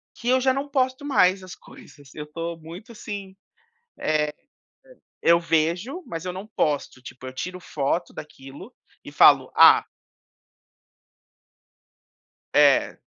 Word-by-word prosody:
que 240 - -4
eu 260 0 +4
já 260 0 +2
não 280 +1 -4
posto 260 0 -1
mais 190 -8 +2
as 185 - -10
coisas, 140 -2 -17
eu 150 - -6
estou 165 +2 -6
muito, 180 +9 -11
assim, 200 -3 -8 0.6
eh, 150 -1 0 0.9
e - - +1
eu 170 - +6
vejo, 170 - -1
mas 165 +1 -6
eu 180 - -3
não 190 +3 -8
posto, 145 -4 -1
tipo, 130 0 -11
eu 130 - -7
tiro 180 +5 -6
foto 155 +2 -3
daquilo 145 - -12 0.3
e - - -11
falo: - - +5
"Ah" - - +7 2.7
É. - - +3
180 Hz, 130 wpm, -23 LUFS, 155-230 Hz, 2.7 s, Ah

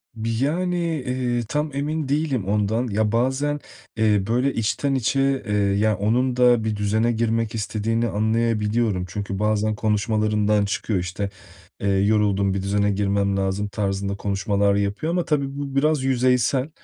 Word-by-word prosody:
Bi 115 0 -3
yani, 180 +4 0 0.3
eee, 125 -2 -1
tam 150 +1 -1
emin 150 +1 -2
değilim 140 -7 0
ondan. 105 +4 0
Ya, 105 0 0
bazen, 130 +5 0 0.4
eee, 105 -3 +3
böyle 125 +4 +1
içten 135 +5 0
içe, 135 +2 +1
eee, 105 - -1
ya, 100 +1 +2
onun 120 +5 +1
da 120 -2 +4
bir 110 -1 -1
düzene 110 +3 +1
girmek 115 0 -1
istediğini 115 +2 -1
anlayabiliyorum. 110 -2 0
Çünkü 100 +1 -4
bazen 105 0 +1
konuşmalarından 105 -1 +1
çıkıyor 100 -1 -1
işte, 90 +3 -3 0.5
“Eee, 100 - -1
yoruldum, 100 0 +2
bir 95 - -2
düzene 100 +1 +1
girmem 100 0 0
lazım.” 95 +1 -1
tarzında 100 -1 -2
konuşmalar 100 0 0
yapıyor 100 +10 -1
ama 175 0 0
tabii 140 -2 -1
bu 140 -1 -5
biraz 150 0 +2
yüzeysel. 130 +1 +2
110 Hz, 145 wpm, -23 LUFS, 100-125 Hz, 0.5 s, da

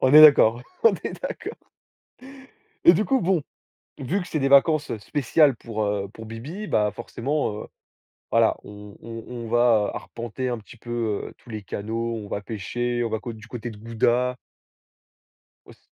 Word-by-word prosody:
On 130 +2 +4
est 155 - +12
d'accord, 125 -6 +7 0.2
on 225 -3 +7
est - - -5
d'accord. - - -6 1.2
Et 170 - +10
du 200 +5 +1
coup 265 +1 +2
bon, 175 -3 +2 0.6
vu 155 +9 -1
que 175 - -7
c'est 155 - -1
des 135 -1 +1
vacances 145 +1 +4
spéciales 140 +4 +2
pour, 110 -2 -4
heu, 100 -1 -1
pour 110 0 -10
bibi, 140 - -7
bah, 105 - +2
forcément, 125 +3 -2
heu, - - -9 0.6
voilà, - - +4
on 105 0 -11
on 115 -1 -8
on 120 -2 -6
va 115 -3 +3
arpenter 120 +2 -5
un 120 - -2
petit 110 +2 -14
peu, 115 -3 -2
heu, - - -15
tous - - -21
les 110 -1 -5
canaux, 115 +4 -3
on 105 -2 -7
va 100 - -3
pêcher, 120 +4 -2
on - - -1
va 110 - -1
co 120 - -6
du 110 0 -12
côté 120 0 -5
de 105 - -11
Gouda. 120 +3 +1 1.3
Ouais, - - -14
c - - -32
120 Hz, 180 wpm, -24 LUFS, 110-140 Hz, 1.3 s, est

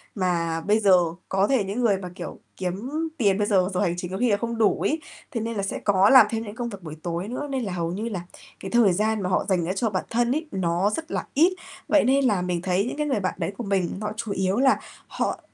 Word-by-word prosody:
mà 170 -4 0
bây 210 +5 +2
giờ 200 -3 +5 0.4
có 195 +1 +2
thể 265 -6 +2
những 200 +5 -3
người 215 -5 +3
mà, 185 -1 -7
kiểu, - - -7 0.2
kiếm 190 +8 -4 0.3
tiền 200 -7 +3
bây 205 0 0
giờ, 190 -3 +3
giờ 180 - 0
hành 175 -4 +1
chính 180 0 -5
có 190 - -3
khi 245 +1 +2
là 200 - +3
không 235 +1 -3
đủ 220 -3 +2
ấy 315 +2 0 0.3
thế 230 - -2
nên 230 0 -3
là 200 - -1
sẽ 195 - -3
có 200 0 +4
làm 260 -4 +9
thêm 225 -1 -2
những 210 -1 -8
công 240 0 -3
việc 200 -4 -9
buổi 155 -2 -7
tối 175 +2 -3
nữa, 255 +5 -4
nên 265 -2 -2
là 195 -4 -3
hầu 170 -1 -2
như 215 +6 -3
là 190 -6 -4 0.4
cái 190 - -7
thời 230 -6 +5
gian 215 +3 0
mà 180 - -1
họ 185 - +1
dành 180 -3 +2
ra 180 - -1
cho 225 +3 0
bản 190 -3 -2
thân 240 +1 +1
ấy, 315 +1 -2
nó 180 +1 +1
rất 320 +9 -5
là - - -2
ít. 335 +6 +4 0.3
Vậy 305 - +4
nên 270 +3 +3
là 205 -7 +2
mình 180 -1 -2
thấy 185 +2 +1
những 250 - -4
cái 300 0 -1
người 265 -7 +1
bạn 185 -2 -1
đấy - - -2
của 240 - -4
mình 195 -3 -1
họ 210 0 -2
chủ 220 -2 -4
yếu 190 +1 0
là 265 +1 +4 0.3
họ - - -2
205 Hz, 280 wpm, -25 LUFS, 185-235 Hz, 0.4 s, làm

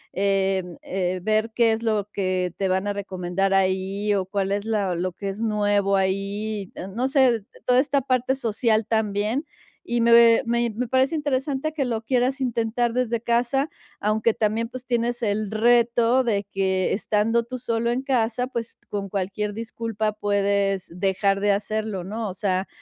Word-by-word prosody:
em, 190 -2 0
eh, 185 -1 -2
ver 215 +2 +1
qué 230 -2 +3
es 220 - -3
lo 215 -3 0
que 185 -2 -1
te 195 - 0
van 190 +2 0
a 205 - 0
recomendar 195 -1 -2
ahí 195 +2 +1
o 195 -2 0
cuál 195 0 -2
es 205 - -1
la 205 -4 0
lo 180 +2 -2
que 200 +3 -7
es 195 +2 -4
nuevo 205 -2 +2
ahí, 200 +1 -2
em, 190 +1 -7
no 250 +3 +1
sé, 270 -2 +5
eh, - - -14 0.2
toda 250 0 +4
esta 280 -1 +1
parte 255 0 +1
social 225 -3 +1
también. 220 +5 0 0.4
Y 240 0 -1
me 235 0 +6
me 235 0 +1
me 250 +1 -2
parece 260 +5 +2
interesante 285 0 -1
que 300 -3 -1
lo 230 -3 -2
quieras 255 +3 +1
intentar 235 -1 0
desde 240 -2 0
casa, 245 +5 +1 0.3
aunque 215 +2 +1
también, 220 +2 0
pues, 255 0 -8
tienes 240 0 -1
el 210 -1 0
reto 235 +2 +3
de 205 -4 0
que 190 -1 0
estando 215 +3 +1
tú 255 +2 -6
solo 235 -1 -1
en 245 +2 -1
casa, 250 -2 0
pues, 235 -3 -5
con 200 -1 -4
cualquier 200 +2 -2
disculpa 225 -1 -3
puedes 200 -2 0
dejar 195 +1 +1
de 205 0 +3
hacerlo, 210 -1 -2
¿no? 215 +2 -4
O - - -5
sea, 190 -2 -1
215 Hz, 175 wpm, -24 LUFS, 195-235 Hz, 0.4 s, me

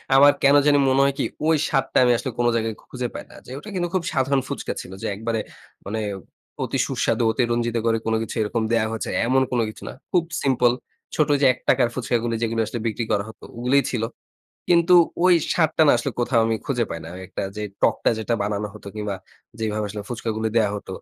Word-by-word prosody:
আমার 145 +2 +8
কেন 140 +1 +6
জানি 145 -1 +5
মনে 135 +1 +4
হয় 140 0 +2
কি - - +2 0.2
ঐ - - +2 0.2
স্বাদটা 135 - 0
আমি 125 - +4
আসলে 130 0 -4
কোনো 120 0 +3
জায়গায় 110 -1 -1
খুঁজে 125 -1 -3
পাই - - -6
না। - - -15
যে - - -11
ওটা 210 - -10
কিন্তু 175 -1 0
খুব 180 - +1
সাধারণ 135 0 +2
ফুচকা - - -4
ছিল 90 - -11
যে - - -1
একবারে 115 +2 -2 0.5
মানে 110 +2 -3 0.6
অতি - - -2
সুস্বাদু 120 - 0
অতিরঞ্জিত 120 0 0
করে 115 0 +3
কোনো 110 0 +1
কিছু 115 - -5
এরকম 115 +2 -1
দেয়া 115 -2 +3
হয়েছে। 110 - -4 0.2
এমন 130 +2 +3
কোনো 120 -2 +2
কিছু - - -11
না। - - -7 0.2
খুব 175 -2 +3 0.2
সিম্পল 125 -3 +3 0.4
ছোট 155 -2 +2
যে - - +5
৳১ - - +1
র - - -8
ফুচকাগুলো 120 -2 -1
যেগুলো 115 0 -1
আসলে 120 - -5
বিক্রি 115 +2 -2
করা 100 -1 +1
হতো 110 - -15
ওগুলোই 130 +4 +3
ছিল। 120 -3 -1 0.7
কিন্তু 170 +1 +5 0.3
ঐ - - +3 0.3
স্বাদটা 160 -1 +2
না - - +7
আসলে 140 - -2
কোথাও 120 -1 +2
আমি 115 0 +1
খুঁজে 125 -5 0
পাই 85 - -4
না। - - -8 0.2
একটা - - -5
যে 105 - -3 0.2
টকটা - - +3
যেটা 115 +2 -1
বানানো 105 0 -2
হতো 105 -1 -10
কিংবা 105 -2 -3 0.4
যেভাবে 110 -1 -1
আসলে 105 0 -6
ফুচকাগুলো 110 -2 -3
দেয়া 105 -3 +3
হত। 100 - -10
120 Hz, 210 wpm, -23 LUFS, 110-135 Hz, 0.7 s, আমার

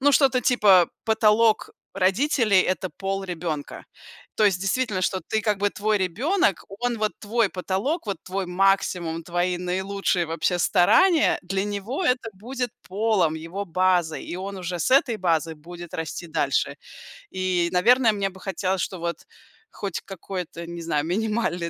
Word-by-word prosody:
ну, 285 +1 +4
что-то 265 -2 +4
типа: 205 -8 +5 0.2
"Потолок 220 0 +3 0.2
родителей- 200 +2 +3
это 185 +1 -1
пол 195 0 -3
ребёнка". 165 -5 -5 0.5
То 215 - +3
есть 190 -3 +2
действительно, 195 -1 0
что 185 +1 0
ты, 220 -1 0
как 210 -2 0
бы, 205 +1 +2
твой 210 +1 0
ребёнок, 205 - +1
он 240 +4 -3
вот 215 0 0
твой 220 -1 0
потолок, 200 - -2
вот 200 - -2
твой 190 0 -3
максимум, 180 -3 +1
твои 175 +1 -1
наилучшие 185 0 -1
вообще 165 +2 -1
старания, 315 - +4
для 190 +2 -2
него 205 - -3
это 250 -3 +1
будет 245 +5 -4 0.2
полом, 195 -5 +1
его 165 +5 -5
базой. 180 -2 +1
И 175 - -6
он 195 +1 -5
уже 180 -1 -4
с 160 - 0
этой 255 -4 +3
базы 165 -2 0
будет 175 +2 -11
расти 160 +2 -5
дальше. 155 -4 0 0.5
И, 185 -2 0
наверное, 230 +6 +4
мне 200 -1 -1
бы 190 - -15
хотелось, 190 -1 -1
чтоб 185 - -4
вот 170 0 -3 0.5
хоть 195 -4 -4
какое-то, 180 -2 -7
не 170 0 -7
знаю, 155 -2 -1
минимальное 195 -2 -1
190 Hz, 155 wpm, -24 LUFS, 175-215 Hz, 0.5 s, типа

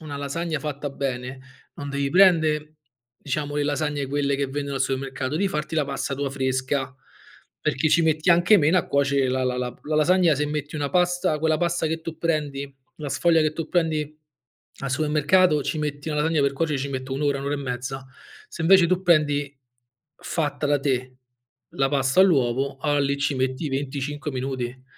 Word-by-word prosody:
una 150 -3 -7
lasagna 155 +3 -3
fatta 145 -1 -4
bene 130 -1 -4 0.3
non 145 - -7
devi 140 0 -1
prende, 160 -5 +3 0.4
diciamo, 145 +2 -3
le 145 - +1
lasagne 145 -1 -1
quelle 140 0 0
che 140 0 -1
vendono 140 0 -4
al - - -3
supermercato, 135 0 -3
devi 190 +6 +1
farti 150 -2 -3
la 155 -2 +2
pasta 140 0 -3
tua 140 0 -3
fresca, 130 0 -1 0.7
perché 145 +4 0
ci 170 +2 +4
metti 160 +1 +2
anche 175 +5 +6
meno 165 +3 +4
a - - -2
cuoce 140 -1 +2
la 130 0 0
la 125 0 -1
la 125 -1 -3
p - - -25
la 155 +1 -1
lasagna, 170 +1 +4
se 150 +2 -1
metti 150 0 -4
una 145 -2 -2
pasta 180 -3 +1
quella 160 0 +2
pasta 175 -1 0
che 160 +1 -2
tu 160 0 -7
prendi 145 -4 -2 0.2
la 150 -2 -5
sfoglia 165 +3 +3
che 155 - +1
tu 165 +1 -5
prendi 155 -3 -1 0.6
al 135 - -4
supermercato, 150 +3 +3
ci 155 - -2
metti 150 0 -4
una 150 -1 -1
lasagna, 160 0 +1
per 140 -1 +2
cuocere, 150 0 -1
ci 140 +1 -3
metto 130 -1 -5
1 135 - -2
ora, 140 -1 +1
1 135 - -6
ora 145 - 0
e - - -3
mezza. 130 0 -5 0.4
Se 165 - -6
invece 185 +1 +6
tu 185 +2 0
prendi 145 -5 +2 0.6
fatta 150 -2 -2
da 145 0 +2
te 130 -2 -2 0.5
la 135 0 0
pasta 135 +4 +2
all'uovo, 135 -6 +2
alla 145 +1 +1
lì 140 0 0
ci 145 0 0
metti 130 +3 -1
25 140 +2 -3
minuti." 130 -1 -4
145 Hz, 190 wpm, -24 LUFS, 135-155 Hz, 0.7 s, anche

